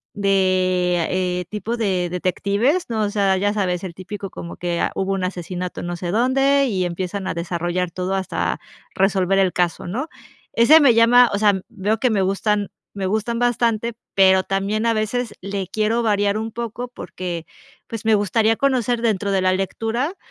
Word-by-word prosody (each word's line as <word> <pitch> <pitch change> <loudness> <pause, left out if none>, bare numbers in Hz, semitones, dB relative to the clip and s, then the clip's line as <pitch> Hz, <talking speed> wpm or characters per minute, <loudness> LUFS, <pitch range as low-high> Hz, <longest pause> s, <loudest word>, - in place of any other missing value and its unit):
de, 185 -3 +2
eh, 180 -1 -1
tipo 220 +3 -3
de 185 -5 0
detectives, 200 - 0
¿no? 220 -2 0
O 205 - 0
sea, 195 -2 +2
ya 205 +2 +1
sabes, 185 -3 -1
el 170 - -6
típico 195 +1 -7
como 170 - -8
que: 175 -1 -2
"Ah, - - 0
hubo 195 0 -1
un 190 -1 -2
asesinato 180 0 -4
no 175 0 -3
sé 175 0 -4
dónde 270 +5 +3
y 190 -5 0
empiezan 185 +2 -4
a - - -1
desarrollar 175 +1 -2
todo 185 +2 -2
hasta 190 -1 -2 0.4
resolver 195 0 +2
el 190 -2 +2
caso", 175 -1 -1
¿no? 260 - -3 0.4
Ese 290 +8 +7
me 260 -5 +6
llama, 240 +2 +6
o - - +1
sea, 205 -3 +3
veo 215 0 -1
que 255 - +2
me 205 -3 +1
gustan 200 +1 0 0.2
me 195 -1 -4
gustan 220 +3 -1
bastante, 235 -1 +1 0.2
pero 190 -1 +5
también 200 +3 -1
a 230 - +3
veces 215 +1 -2
le 195 -1 -4
quiero 220 +2 0
variar 205 -1 +1
un 220 +1 -4
poco 235 +1 -5
porque, 175 -8 -6 0.4
pues 225 -1 -6
me 220 -1 +5
gustaría 220 +2 +2
conocer 245 -4 +1
dentro 205 -3 0
de 190 -1 +2
la 185 0 +3
lectura, 225 - -2
200 Hz, 180 wpm, -21 LUFS, 185-225 Hz, 0.4 s, Ese